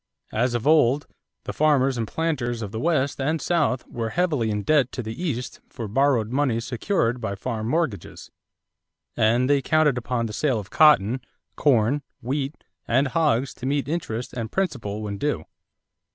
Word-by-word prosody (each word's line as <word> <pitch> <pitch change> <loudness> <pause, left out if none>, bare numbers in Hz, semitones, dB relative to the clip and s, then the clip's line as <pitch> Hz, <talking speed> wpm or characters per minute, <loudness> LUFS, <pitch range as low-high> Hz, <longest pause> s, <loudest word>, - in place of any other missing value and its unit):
As 120 +2 0
of 120 +1 -2
old, 145 -2 +4 0.4
the - - -5
farmers 140 -3 +3
and 115 -2 -2
planters 120 -6 -2
of 100 - -6
the 110 - -4
West 145 -3 0
and 155 +4 0
South 150 -8 0
were 115 -1 -4
heavily 150 -8 0
in 105 -1 -2
debt 140 0 +3
to 125 - -4
the 110 0 -5
East 130 -8 -3
for 115 - -6
borrowed 120 -1 +2
money 130 -4 +1
secured 125 - -1
by 100 -3 -3
farm 110 +1 -4
mortgages; 145 - -2 0.8
and 120 +4 +3
they 140 0 +3
counted 150 -2 +2
upon 120 -1 -2
the 110 - -5
sale 130 +1 +1
of 105 -2 -7
cotton, 130 -6 +5 0.3
corn, 135 0 +2 0.2
wheat, 135 +3 -3 0.2
and 130 +3 +2
hogs 140 -5 +1
to 130 - -6
meet 140 0 0
interest 125 -7 -3
and 115 -3 -4
principal 120 - -2
when 100 -1 -4
due. 145 - -1
130 Hz, 165 wpm, -24 LUFS, 115-150 Hz, 0.8 s, cotton